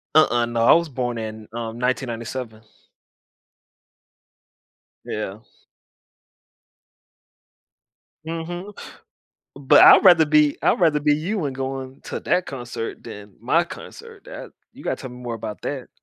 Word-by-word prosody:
Uh-uh, 120 -6 +4
no, 120 -1 -1
I - - +7
was 170 -1 +2
born 125 -2 -3
in, 110 -1 -7
um, 115 -1 -5
1997. 120 -2 -3 2.4
Yeah. 105 -1 -5 2.9
Mhm, 175 +5 -6 0.8
but 140 -1 +5
I'd - - +8
rather 170 -4 +7
be 150 -1 +3
I'd - - +2
rather 155 -4 +3
be 145 0 +3
you 175 +5 -2
and 135 -2 -3
going 135 0 -5
to - - -5
that 180 - 0
concert 120 -4 -6
than 100 -1 -11
my 160 +9 +2
concert 455 - -12
that - - -10 0.2
you - - -14
gotta - - -1
tell 130 -3 -9
me 125 - -11
more 120 -1 -4
about 105 -1 -7
that. 135 -3 -5
130 Hz, 125 wpm, -22 LUFS, 115-160 Hz, 2.9 s, I'd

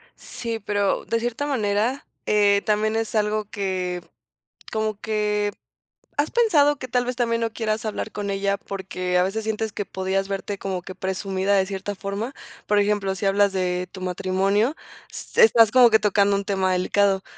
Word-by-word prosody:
Sí, 230 -2 -5
pero 205 -1 0
de 230 0 0
cierta 240 +4 -2
manera, 225 0 0 0.2
eh, 205 -1 +4
también 215 +1 +1
es 225 0 -2
algo 210 0 +1
que 185 -4 -3 0.7
como 215 -1 -2
que, 210 -1 0 0.7
¿has 290 +2 +1
pensado 300 -12 +4
que 255 - -6
tal 245 0 +1
vez 250 0 -2
también 230 -1 +1
no 225 -1 -1
quieras 220 0 -2
hablar 215 0 -3
con 205 -1 -4
ella, 200 0 0
porque 185 -2 -3
a 180 - +4
veces 215 +4 -2
sientes 220 0 -2
que 205 - -3
podías 190 +1 -2
verte 200 +1 -3
como 190 -2 -3
que 185 +1 -9
presumida 190 +1 -1
de 190 -1 +3
cierta 200 +1 -5
forma? 205 +6 -4 0.3
Por 210 0 +3
ejemplo, 200 -2 +1
si 195 - -4
hablas 200 0 +3
de 180 -1 -1
tu 190 - -9
matrimonio, 195 - +1 0.4
se 470 - +1
estás 225 - +6
como 250 -2 +7
que 220 0 +5
tocando 200 -1 +3
un 200 0 -2
tema 190 -2 +1
delicado. 195 +1 +2
205 Hz, 175 wpm, -23 LUFS, 195-220 Hz, 0.7 s, como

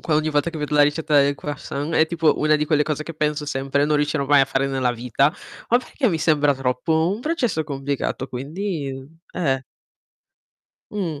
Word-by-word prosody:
ogni 155 +1 +2
volta 150 +3 +1
che 160 - -7
vedo 150 0 -3
la 145 - +6
ricetta 150 0 +3
del 140 +1 +2
croissant, 145 +1 -5
è 160 - +4
tipo 165 -3 +1
una 155 0 +3
di 150 - 0
quelle 150 -1 +3
cose 155 0 -2
che 165 0 -8
penso 150 -1 -1
sempre 135 +1 0
non 150 0 +2
riuscirò 145 -1 0
mai 145 -1 +6
a - - +4
fare 135 0 0
nella 130 -2 0
vita, 125 +5 +1 0.4
ma 240 - +5
perché 255 0 -1
mi 165 - 0
sembra 150 -2 +3
troppo 135 +6 0
un 220 - -8
processo 245 - -1
complicato 140 -2 -3
quindi, 145 +3 -4 0.4
mhmm, 180 - -3
eh. 135 -1 0 1.3
Mh. 170 -8 -3
150 Hz, 195 wpm, -22 LUFS, 140-160 Hz, 1.3 s, la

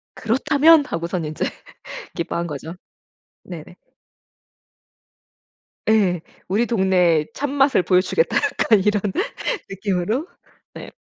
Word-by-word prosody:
"그렇다면!" 290 +6 +4
하고서는 170 - -3
인제 155 - -3 0.7
기뻐한 170 0 -3
거죠. 155 +2 -7 0.7
네네. 175 -1 -10 2.1
예. 195 -6 +2 0.3
"우리 210 +6 +1
동네의 185 -8 +2
참맛을 275 -5 +1
보여 180 0 +3
주겠다!" 480 - 0
약간 215 -3 +2
이런 210 0 +1 0.7
느낌으로? 195 - -2 0.5
네. - - -10
190 Hz, 215 characters per minute, -21 LUFS, 170-240 Hz, 2.1 s, 그렇다면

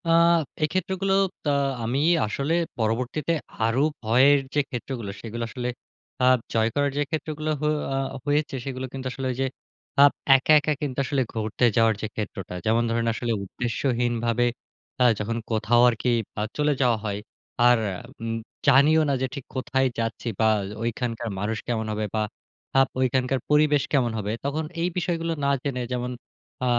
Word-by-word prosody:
আ - - 0 0.5
এই - - +4
ক্ষেত্রগুলো 190 +1 0 0.4
আ - - +3 0.3
আমি 120 +4 0 0.3
আসলে 140 +9 -1 0.2
পরবর্তীতে 125 +8 0 0.3
আরো 115 +4 +2 0.2
ভয়ের 130 +6 +5
যে 150 - +2
ক্ষেত্রগুলো 120 -4 -5
সেগুলো 115 +1 -5
আসলে 125 +1 -3 0.5
আ - - +6 0.3
জয় 110 0 +3
করার 145 -1 +2
যে - - +2
ক্ষেত্রগুলো 155 -1 -3
হ - - -4 0.3
আ - - 0 0.3
হয়েছে 145 0 0
সেগুলো 130 -1 -4
কিন্তু 135 -1 -4
আসলে 135 +1 -5
ওই - - -4
যে - - +2 0.6
আপ 145 - +8 0.2
একা, 135 +3 +2
একা 150 +1 0
কিন্তু 140 -4 -3
আসলে 140 0 0
ঘুরতে 110 +2 0
যাওয়ার 115 -1 +4
যে 110 - -2
ক্ষেত্রটা। 100 -3 -5
যেমন 115 +2 +3
ধরেন 115 0 0
আসলে 120 +1 -2
উদ্দেশ্যহীনভাবে 120 +1 0 0.6
আ - - +7 0.2
যখন 115 +2 -2
কোথাও 115 +2 +3
আরকি 120 +1 -1 0.3
আ - - 0 0.2
চলে 150 0 +2
যাওয়া 120 -3 +3
হয় 100 -1 -2 0.5
আর 120 0 +6 0.4
উম 115 0 -2 0.3
জানিও 145 +4 +6
না - - +2
যে - - +2
ঠিক 140 - -7
কোথায় 130 +1 +1
যাচ্ছি, 115 +1 -3
বা 110 - +4 0.3
ওইখানকার 115 0 -2
মানুষ 105 +2 -1
কেমন 110 -2 -1
হবে, 105 0 -1
বা 110 - +1 0.6
আপ 135 - +5
ঐখানকার 130 +1 +1
পরিবেশ 150 -1 +4
কেমন 125 -4 +3
হবে। 105 -1 -2
তখন 155 +3 -1 0.2
এই 170 - +2
বিষয়গুলো 165 -2 -1
না 140 - +2
জেনে 135 -3 -2
যেমন 125 0 -2 0.5
আ - - +2
125 Hz, 165 wpm, -25 LUFS, 115-145 Hz, 0.6 s, আপ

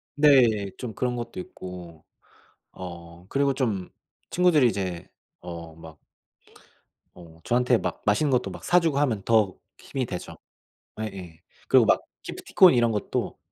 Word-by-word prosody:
네. 125 -9 +4
좀 120 -4 -6
그런 125 +1 -1
것도 120 +9 -6
있고. 90 - -9 0.7
어 85 -1 -10
그리고 140 0 +1
좀 110 -9 -2 0.4
친구들이 175 -7 +4
이제 95 -6 -4 0.3
어 85 -2 -8
막 80 -2 -13 1.2
어 80 -2 -15
저한테 125 0 +2
막 - - -4
맛있는 135 +8 +2
것도 125 -1 +1
막 - - -10
사 180 - +4
주고 160 -5 0
하면 115 -9 0
더 110 -4 +2 0.2
힘이 135 -2 -4
되죠. 90 -5 -7 0.6
예예. 95 -7 -7 0.3
그리고 - - +6
막 - - +3 0.2
기프티콘 185 -5 +4
이런 120 -2 +3
것도 105 - -3
110 Hz, 250 characters per minute, -25 LUFS, 90-130 Hz, 1.2 s, 그리고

